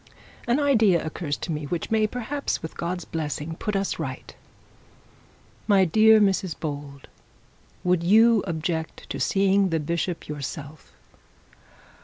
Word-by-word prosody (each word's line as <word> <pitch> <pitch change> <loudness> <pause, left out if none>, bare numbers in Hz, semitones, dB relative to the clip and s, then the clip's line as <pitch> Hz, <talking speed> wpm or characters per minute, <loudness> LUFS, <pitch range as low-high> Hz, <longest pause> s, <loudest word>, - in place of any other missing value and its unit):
An 240 +4 +2
idea 225 - +3
occurs 155 -1 -3
to 170 - -5
me, 150 -1 -3
which 165 +6 -4
may, 220 -1 +3
perhaps, 250 - -3
with 160 - -7
God's 175 0 -4
blessing, 155 0 -4
put 210 -2 -3
us 195 0 -1
right. - - -6 1.3
My 195 -3 +5
dear 220 +5 +6
Mrs 190 -4 +1
Bold, 145 -3 -6 0.8
would 180 -1 +2
you 220 +4 +5
object 160 -1 -3
to - - -4
seeing 195 0 +2
the 165 -1 0
bishop 170 +3 -3
yourself?' 150 0 -7
175 Hz, 130 wpm, -25 LUFS, 155-210 Hz, 1.3 s, dear